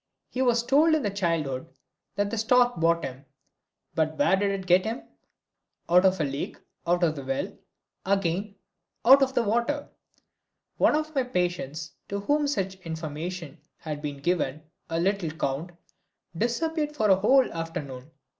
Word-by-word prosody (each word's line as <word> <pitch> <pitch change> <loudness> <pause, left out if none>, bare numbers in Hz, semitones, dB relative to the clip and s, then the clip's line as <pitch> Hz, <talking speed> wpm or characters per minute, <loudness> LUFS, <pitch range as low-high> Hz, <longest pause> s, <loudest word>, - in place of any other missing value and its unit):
He 255 - -3
was 240 -2 +3
told 300 +6 +4
in 220 -10 -1
childhood 165 -7 -1 0.5
that 200 0 0
the 230 - -2
stork 245 +2 +4
brought 170 0 +2
him 130 +1 -7 0.7
but 155 -1 0
where 285 -9 +4
did 200 +1 +1
it 195 -1 -3
get 185 +1 +5
him? 225 +5 -4 0.8
Out 180 +2 +5
of 190 -1 +3
a - - +2
lake, 140 0 -4 0.3
out 175 +1 +2
of 160 -2 +2
the 140 - -6
well 135 0 -3 0.5
again, 195 +1 0 0.5
out 270 +3 +9
of 265 -1 +1
the 240 - +3
water. 240 +7 0 0.9
One - - +4
of 310 0 -2
my 270 - +2
patients 175 - -2 0.2
to 200 - -2
whom 290 +7 +1
such 195 -8 -2
information 160 0 -5 0.2
had 150 -2 -6
been 145 -2 -4
given, 155 -3 0 0.3
a 165 0 -1
little 190 -1 0
count, 150 +1 -3 0.7
disappeared 300 - -1
for 215 -7 +3
a - - +8
whole 250 +7 +3
afternoon. 150 -5 -6
185 Hz, 155 wpm, -27 LUFS, 160-240 Hz, 0.9 s, out